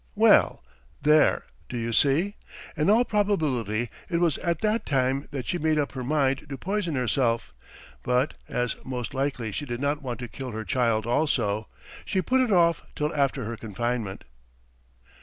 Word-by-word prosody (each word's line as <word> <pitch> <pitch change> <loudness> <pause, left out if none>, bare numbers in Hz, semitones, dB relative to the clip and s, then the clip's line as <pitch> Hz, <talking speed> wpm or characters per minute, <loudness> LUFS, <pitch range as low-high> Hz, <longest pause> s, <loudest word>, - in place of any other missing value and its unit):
"Well, - - +5 0.4
there, 150 +1 +4 0.3
do 125 - -4
you 115 0 -2
see?... 145 - +3 0.4
In 155 +3 +1
all 230 +4 +5
probability 140 - 0 0.2
it 170 - +1
was 170 -4 +2
at 170 -3 -1
that 215 +1 +1
time 135 0 0
that 135 -3 -5
she 175 - -1
made 155 0 +2
up 145 -2 0
her 130 -2 -5
mind 140 0 +1
to 135 - -5
poison 185 0 -2
herself, 120 - 0 0.5
but, 125 +3 +1 0.2
as 125 -1 -1
most 125 -2 -4
likely 135 -5 -2
she 145 - -4
did 120 -1 -4
not 145 +2 0
want 125 -3 -4
to 120 - -4
kill 125 +1 -7
her 110 0 -4
child 110 +2 +1
also, 110 -5 +1 0.4
she 190 - -1
put 260 +7 +2
it 250 -4 +1
off 170 -3 +4
till 150 +1 -1
after 140 -3 0
her 115 +2 -4
confinement." 115 -1 -3
135 Hz, 170 wpm, -26 LUFS, 120-160 Hz, 0.5 s, Well